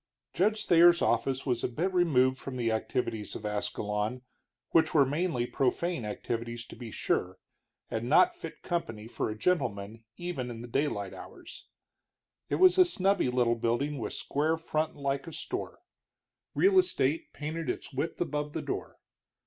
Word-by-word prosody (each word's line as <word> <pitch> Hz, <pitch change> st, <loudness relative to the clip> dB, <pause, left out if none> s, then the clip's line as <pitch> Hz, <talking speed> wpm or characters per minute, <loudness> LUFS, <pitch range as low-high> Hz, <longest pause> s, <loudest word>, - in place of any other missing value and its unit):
Judge 215 Hz, +4 st, +1 dB
Thayer's 170 Hz, 0 st, +6 dB
office 135 Hz, -1 st, +1 dB
was 125 Hz, -4 st, 0 dB
a -, -, +2 dB
bit 170 Hz, +10 st, -2 dB
removed 130 Hz, -7 st, +3 dB
from 135 Hz, -2 st, -6 dB
the 115 Hz, -2 st, 0 dB
activities 110 Hz, -1 st, -2 dB
of 105 Hz, -, -7 dB
Ascalon, 105 Hz, +3 st, -2 dB, 0.5 s
which 160 Hz, -1 st, +3 dB
were 140 Hz, -3 st, +7 dB
mainly 150 Hz, -2 st, 0 dB
profane 135 Hz, +2 st, 0 dB
activities, 115 Hz, +2 st, -4 dB
to -, -, -11 dB
be 120 Hz, -2 st, -8 dB
sure, 95 Hz, -3 st, -1 dB, 0.5 s
and 115 Hz, +2 st, -2 dB
not 350 Hz, -, +5 dB
fit 350 Hz, -, -9 dB
company 115 Hz, -11 st, -3 dB
for 115 Hz, -, -2 dB
a 110 Hz, -, -5 dB
gentleman 115 Hz, -, -1 dB
even 175 Hz, -8 st, -4 dB
in 115 Hz, -1 st, -7 dB
the -, -, -7 dB
daylight 115 Hz, -6 st, -1 dB
hours. -, -, -11 dB, 0.8 s
It -, -, +1 dB
was 370 Hz, 0 st, +6 dB
a 365 Hz, -, +9 dB
snubby 195 Hz, -, +1 dB
little 125 Hz, -1 st, +2 dB
building 120 Hz, +5 st, -1 dB
with 110 Hz, -, -4 dB
square 155 Hz, +3 st, 0 dB
front 155 Hz, -1 st, -2 dB
like 140 Hz, +1 st, -2 dB
a -, -, -6 dB
store, -, -, -5 dB, 0.7 s
"Real 385 Hz, 0 st, +5 dB
Estate" 160 Hz, -, 0 dB
painted 155 Hz, +2 st, -4 dB
its -, -, -4 dB
width 150 Hz, +5 st, -3 dB
above 150 Hz, -3 st, -2 dB
the -, -, -3 dB
door. -, -, -4 dB
135 Hz, 160 wpm, -30 LUFS, 115-165 Hz, 0.8 s, a